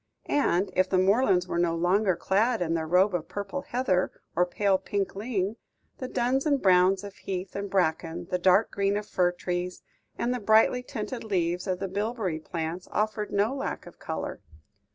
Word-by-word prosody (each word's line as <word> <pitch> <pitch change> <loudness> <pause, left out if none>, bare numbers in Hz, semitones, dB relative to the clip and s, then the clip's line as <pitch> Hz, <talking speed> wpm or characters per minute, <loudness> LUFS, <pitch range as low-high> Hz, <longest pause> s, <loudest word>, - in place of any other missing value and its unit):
And, 195 -9 +1
if 185 0 +3
the 190 - +2
moorlands 190 -1 +3
were 170 - -1
no 170 -1 +2
longer 185 +3 +2
clad 215 +7 +1
in 165 -2 0
their 160 -1 -1
robe 185 +4 +4
of 170 -2 -2
purple 205 +7 -4
heather, 235 -9 0 0.2
or 180 +2 +3
pale 195 +1 +1
pink 200 -2 -2
ling, 205 -1 -2 0.4
the 255 - -4
duns 255 +4 0
and 285 -2 +3
browns 185 0 +4
of 200 -1 -8
heath 190 -2 -5
and 200 0 -3
bracken, 165 -3 0
the 180 - +1
dark 190 +4 +4
green 200 0 +1
of 210 - -4
fir 180 -4 +1
trees, 180 0 -4 0.3
and 240 +1 0
the 250 - -2
brightly 220 +3 +4
tinted 230 0 -5
leaves 180 -3 -1
of 185 -1 0
the 195 - -3
bilberry 200 -3 -2
plants 165 +2 -5
offered 210 0 -1
no 205 +5 +1
lack 275 - -4
of - - -14
colour. - - -5
195 Hz, 185 wpm, -27 LUFS, 180-215 Hz, 0.4 s, robe